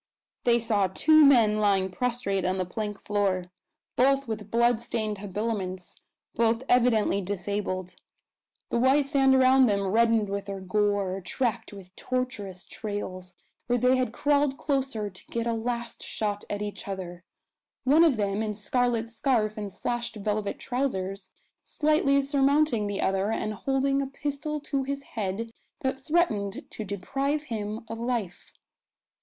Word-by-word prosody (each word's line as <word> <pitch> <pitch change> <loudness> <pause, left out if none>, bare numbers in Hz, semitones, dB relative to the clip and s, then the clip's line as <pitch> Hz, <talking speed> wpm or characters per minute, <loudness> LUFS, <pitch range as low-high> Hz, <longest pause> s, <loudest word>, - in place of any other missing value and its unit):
They 235 -1 +5
saw 210 -4 +1
two 310 - +5
men 230 -7 +5
lying 195 -2 +2
prostrate 235 -4 -1
on 185 +1 0
the 185 - 0
plank 205 +2 -4
floor; 190 -3 0 0.4
both 275 +1 +3
with 210 -2 -5
bloodstained 230 -2 +1
habiliments, 195 -2 -4 0.4
both 230 +1 +1
evidently 235 -5 +3
disabled; 190 -1 -3 0.8
the 235 - +1
white 270 +3 +4
sand 270 -2 +4
around 260 0 +6
them 200 -2 +1
reddened 225 +1 +3
with 200 0 -3
their 200 -1 -5
gore, 195 0 0
tracked 235 +4 -2
with 195 -2 -12
tortuous 215 -8 -3
trails, 185 -4 -6 0.3
where 245 +1 +2
they 250 +2 +4
had 255 -3 0
crawled 285 +1 +1
closer 265 -7 -1
to 185 -2 -10
get 235 0 -2
a 235 - 0
last 235 +1 -3
shot 205 -1 -3
at 205 0 -2
each 205 -1 -6
other 180 -3 -6 0.6
one 295 +5 +5
of 305 -8 +4
them, 200 0 0
in 215 -1 -2
scarlet 235 +2 0
scarf 225 -2 0
and 205 -2 -5
slashed 240 +3 -3
velvet 210 0 -2
trousers, 195 -7 -3 0.3
slightly 295 -2 +2
surmounting 280 -4 +2
the 205 -1 -3
other, 195 +1 +1
and 215 -1 -2
holding 275 +4 0
a 275 - -2
pistol 290 +2 -3
to 280 -1 -2
his 275 +1 -4
head 220 -1 -4 0.3
that 265 0 -1
threatened 265 - 0
to 220 - -5
deprive 270 +10 -2
him 220 -3 -5
of 225 - -6
life. 230 -7 -3
225 Hz, 145 wpm, -27 LUFS, 200-260 Hz, 0.8 s, around